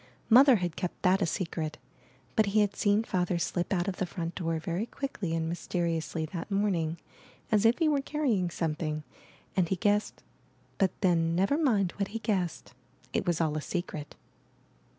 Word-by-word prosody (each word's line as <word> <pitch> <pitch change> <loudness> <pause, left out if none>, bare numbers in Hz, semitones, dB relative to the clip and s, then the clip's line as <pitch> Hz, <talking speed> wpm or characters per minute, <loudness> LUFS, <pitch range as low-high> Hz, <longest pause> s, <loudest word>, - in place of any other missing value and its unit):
Mother 260 +2 +8
had 180 -5 -2
kept 180 - -4
that 190 +1 +4
a 180 - +2
secret, 160 -3 -3 0.6
but 220 - +4
he 210 +2 +3
had 205 -1 +1
seen 205 +1 +2
Father 180 -4 0
slip 175 +1 -1
out 180 -1 +1
of 195 - -2
the 185 - -1
front 170 -1 -4
door 165 -2 -1
very 170 +7 -2
quickly 220 -12 -3
and 160 -1 -1
mys 170 0 -5
teriously 165 -2 -1
that 175 +1 -5
morning 185 -5 0 0.5
as 215 0 +5
if 230 - +3
he 325 - +2
were 290 -2 +2
carrying 260 - 0
some 165 -2 -1
thing, 155 -1 -3 0.5
and 180 -3 +2
he 190 - +2
guessed 205 +3 0 0.3
— - - -35
but 195 - +4
then, 165 -3 +2
never 195 +10 +2
mind 220 - +2
what 200 -1 0
he 220 - -5
guessed 195 -7 -2 0.2
— - - -30
it - - -1
was 175 -2 +1
all 155 -2 +1
a 155 - -1
secret. 155 -3 -4
180 Hz, 190 wpm, -29 LUFS, 165-210 Hz, 0.6 s, Mother